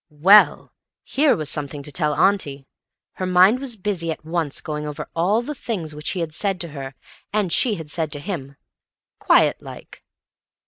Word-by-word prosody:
Well! 185 Hz, +8 st, +5 dB, 0.3 s
Here 290 Hz, +1 st, +2 dB
was 155 Hz, -2 st, -4 dB
something 145 Hz, +1 st, -5 dB
to 145 Hz, -, -8 dB
tell 150 Hz, 0 st, 0 dB
auntie! 150 Hz, -9 st, +1 dB, 0.5 s
Her 185 Hz, -, -4 dB
mind 185 Hz, +6 st, +5 dB
was 265 Hz, -4 st, -2 dB
busy 190 Hz, -5 st, -3 dB
at 160 Hz, -, -5 dB
once, 160 Hz, -3 st, -2 dB
going 150 Hz, -1 st, -5 dB
over 150 Hz, +1 st, -6 dB
all 195 Hz, +8 st, +1 dB
the 300 Hz, -, -5 dB
things 190 Hz, -, -5 dB
which 150 Hz, 0 st, -3 dB
he 185 Hz, -, -2 dB
had 160 Hz, -2 st, -4 dB
said 195 Hz, +2 st, -1 dB
to 170 Hz, -, -4 dB
her 135 Hz, -2 st, -8 dB, 0.4 s
and 205 Hz, -5 st, 0 dB
she 230 Hz, -5 st, +3 dB
had 160 Hz, -5 st, -7 dB
said 160 Hz, -2 st, -2 dB
to 145 Hz, -, -3 dB
him—quiet 140 Hz, -, -2 dB
like. -, -, -12 dB
165 Hz, 175 wpm, -22 LUFS, 150-200 Hz, 0.5 s, Well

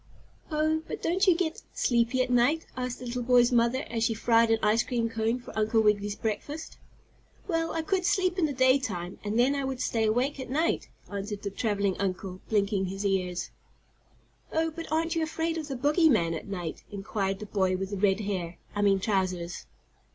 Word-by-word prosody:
"Oh, 310 Hz, 0 st, +1 dB
but -, -, -6 dB
don't 375 Hz, +4 st, +2 dB
you 365 Hz, -, +6 dB
get 330 Hz, -3 st, -2 dB
sleepy 240 Hz, +1 st, +2 dB
at 250 Hz, -, -4 dB
night?" 250 Hz, +7 st, +3 dB
asked 250 Hz, -1 st, -3 dB
the 250 Hz, -, -9 dB
little 245 Hz, +1 st, -3 dB
boy's 245 Hz, 0 st, +4 dB
mother 240 Hz, +3 st, +2 dB
as 225 Hz, -1 st, -2 dB
she 225 Hz, -, +1 dB
fried 230 Hz, +1 st, +3 dB
an 225 Hz, -, +4 dB
ice 215 Hz, +2 st, +4 dB
cream 235 Hz, -2 st, -1 dB
cone 225 Hz, +2 st, 0 dB
for 245 Hz, -, -11 dB
Uncle 220 Hz, +1 st, +2 dB
Wiggily's 205 Hz, -1 st, +2 dB
breakfast. 285 Hz, +9 st, -4 dB, 0.7 s
"Well, 330 Hz, -3 st, 0 dB
I 325 Hz, -, -1 dB
could 380 Hz, +1 st, 0 dB
sleep 370 Hz, -1 st, +1 dB
in 320 Hz, -, +3 dB
the -, -, -3 dB
day 260 Hz, 0 st, +4 dB
time, 180 Hz, -7 st, -5 dB
and 210 Hz, +1 st, -1 dB
then 250 Hz, +4 st, +4 dB
I 280 Hz, -1 st, -1 dB
would 265 Hz, -1 st, -3 dB
stay 225 Hz, -3 st, +1 dB
awake 250 Hz, +6 st, 0 dB
at 260 Hz, -, -6 dB
night," 315 Hz, +6 st, 0 dB, 0.2 s
answered 205 Hz, +1 st, -4 dB
the 200 Hz, -, -3 dB
traveling 200 Hz, -2 st, 0 dB
uncle, 185 Hz, -1 st, -3 dB
blinking 200 Hz, -2 st, +1 dB
his 195 Hz, +2 st, -4 dB
ears. 180 Hz, -3 st, -1 dB, 1.0 s
"Oh, 325 Hz, 0 st, +1 dB
but 330 Hz, +1 st, -8 dB
aren't 330 Hz, +2 st, +1 dB
you 330 Hz, -, +1 dB
afraid 325 Hz, +1 st, -1 dB
of 310 Hz, -, -5 dB
the 275 Hz, -, -4 dB
bogeyman 275 Hz, -, +3 dB
at 165 Hz, -, -6 dB
night?" 175 Hz, -5 st, -5 dB
inquired 195 Hz, -1 st, -2 dB
the 210 Hz, -, -7 dB
boy 190 Hz, -2 st, +1 dB
with 195 Hz, +1 st, -4 dB
the 200 Hz, -, -2 dB
red 195 Hz, +1 st, +2 dB
hair 180 Hz, -4 st, -3 dB, 0.2 s
I 205 Hz, -, -1 dB
mean 200 Hz, -1 st, +4 dB
trousers. 185 Hz, -4 st, -1 dB
230 Hz, 200 wpm, -28 LUFS, 200-285 Hz, 1.0 s, you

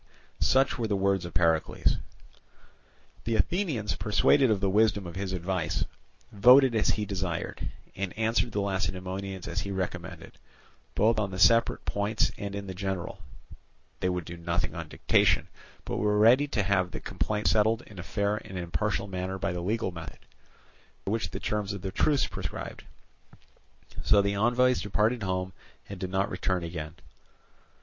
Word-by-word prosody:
Such 135 Hz, -1 st, +3 dB
were 115 Hz, -, 0 dB
the 105 Hz, -, 0 dB
words 95 Hz, -2 st, +1 dB
of 85 Hz, -, -8 dB
Pericles. 85 Hz, -2 st, +2 dB, 1.3 s
The 115 Hz, 0 st, 0 dB
Athenians, 145 Hz, -, 0 dB
persuaded 120 Hz, +5 st, +3 dB
of 105 Hz, -3 st, +2 dB
the 100 Hz, -, +1 dB
wisdom 105 Hz, 0 st, +3 dB
of 85 Hz, -, -7 dB
his 95 Hz, 0 st, -3 dB
advice, 90 Hz, -2 st, -1 dB, 0.5 s
voted 125 Hz, +5 st, +7 dB
as 110 Hz, -, +2 dB
he 105 Hz, -, 0 dB
desired, 95 Hz, -4 st, -3 dB, 0.3 s
and 95 Hz, -1 st, -3 dB
answered 115 Hz, +2 st, +1 dB
the 105 Hz, -, -1 dB
Lacedaemonians 95 Hz, 0 st, -3 dB
as 90 Hz, -, -2 dB
he 100 Hz, -, -5 dB
recommended, 95 Hz, -2 st, -5 dB, 0.6 s
both 110 Hz, +1 st, +3 dB
on 100 Hz, -2 st, 0 dB
the 95 Hz, -, -6 dB
separate 115 Hz, +4 st, +4 dB
points 100 Hz, +2 st, 0 dB
and 100 Hz, -1 st, -4 dB
in 100 Hz, 0 st, -5 dB
the 95 Hz, -, -6 dB
general; 95 Hz, 0 st, -4 dB, 0.8 s
they 90 Hz, -, 0 dB
would 90 Hz, -2 st, -2 dB
do 85 Hz, -, -7 dB
nothing 85 Hz, +1 st, -1 dB
on -, -, -6 dB
dictation, -, -, +2 dB, 0.4 s
but -, -, -3 dB
were 105 Hz, 0 st, +2 dB
ready 120 Hz, +7 st, +6 dB
to 110 Hz, -7 st, 0 dB
have 95 Hz, -1 st, +1 dB
the -, -, -6 dB
complaints 105 Hz, 0 st, -1 dB
settled 110 Hz, +2 st, +2 dB
in 100 Hz, -4 st, -13 dB
a -, -, -3 dB
fair 100 Hz, +2 st, -1 dB
and 95 Hz, -3 st, -8 dB
impartial 100 Hz, +4 st, -1 dB
manner 95 Hz, 0 st, -3 dB
by -, -, -1 dB
the 90 Hz, -, -3 dB
legal 105 Hz, +2 st, -1 dB
method, 85 Hz, -2 st, -8 dB, 0.9 s
which 110 Hz, +3 st, -1 dB
the -, -, -6 dB
terms 105 Hz, -1 st, -2 dB
of 100 Hz, -2 st, -7 dB
the 95 Hz, -, -3 dB
truce 145 Hz, +7 st, +2 dB
prescribed. -, -, -6 dB, 1.2 s
So 105 Hz, -, +5 dB
the 100 Hz, 0 st, +2 dB
envoys 120 Hz, +5 st, +3 dB
departed 110 Hz, +4 st, +1 dB
home 95 Hz, -1 st, -2 dB, 0.3 s
and 100 Hz, -2 st, -8 dB
did 95 Hz, -, -3 dB
not 95 Hz, +1 st, 0 dB
return 90 Hz, -2 st, -1 dB
again. 80 Hz, -2 st, -6 dB
100 Hz, 165 wpm, -28 LUFS, 95-110 Hz, 1.3 s, voted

